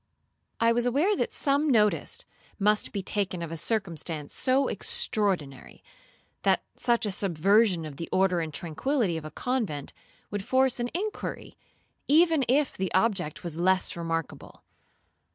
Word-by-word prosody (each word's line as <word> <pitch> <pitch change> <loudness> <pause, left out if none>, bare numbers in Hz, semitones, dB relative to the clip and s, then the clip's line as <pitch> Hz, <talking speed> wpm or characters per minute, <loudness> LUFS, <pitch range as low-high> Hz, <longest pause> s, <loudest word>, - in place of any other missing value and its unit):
'I 230 0 +4
was 240 +1 +1
aware 305 - +2
that - - -1
some 285 +2 +1
notice 210 -5 +2 0.3
must 210 +1 +2
be 200 -2 -4
taken 190 -3 -2
of 165 - -6
a - - -3
circumstance 165 -6 -3
so 265 +2 +2
extraordinary—that 175 -11 -1
such 235 -2 +2
a 205 - -1
subversion 190 0 +2
of 145 -3 -8
the 165 - -6
order 185 -2 +2
and 160 -2 -3
tranquillity 175 - -1
of 160 -1 -5
a - - -5
convent, 210 - -3 0.4
would 205 -1 -3
force 260 +2 +2
an 240 0 -1
inquiry, 420 +4 -4 0.5
even 320 -1 +4
if 275 +3 +2
the 190 -2 -3
object 190 -6 0
was 170 -2 -3
less 185 +1 +2
remarkable. 165 -2 -5
200 Hz, 140 wpm, -27 LUFS, 165-245 Hz, 0.5 s, I